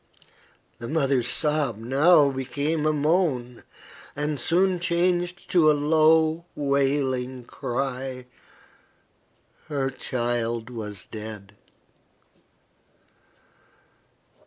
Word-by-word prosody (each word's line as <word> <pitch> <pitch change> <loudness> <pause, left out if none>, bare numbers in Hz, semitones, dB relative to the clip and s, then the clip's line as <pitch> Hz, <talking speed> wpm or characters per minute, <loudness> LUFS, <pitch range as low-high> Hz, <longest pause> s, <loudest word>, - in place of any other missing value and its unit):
The 115 - -6
mother's 135 -5 +1
sob 145 -2 0
now 140 +6 +4
became 145 +4 -2
a - - +3
moan, 150 -6 0 0.5
and 150 0 -2
soon 180 +7 +2
changed 175 +1 0
to 165 -4 +5
a - - +6
low, 160 +2 +3
wailing 135 -3 0
cry. 130 +1 -4 1.4
Her 140 -3 -1
child 120 -2 -2
was 105 -5 -6
dead. 105 -2 -9
140 Hz, 80 wpm, -25 LUFS, 125-155 Hz, 1.4 s, a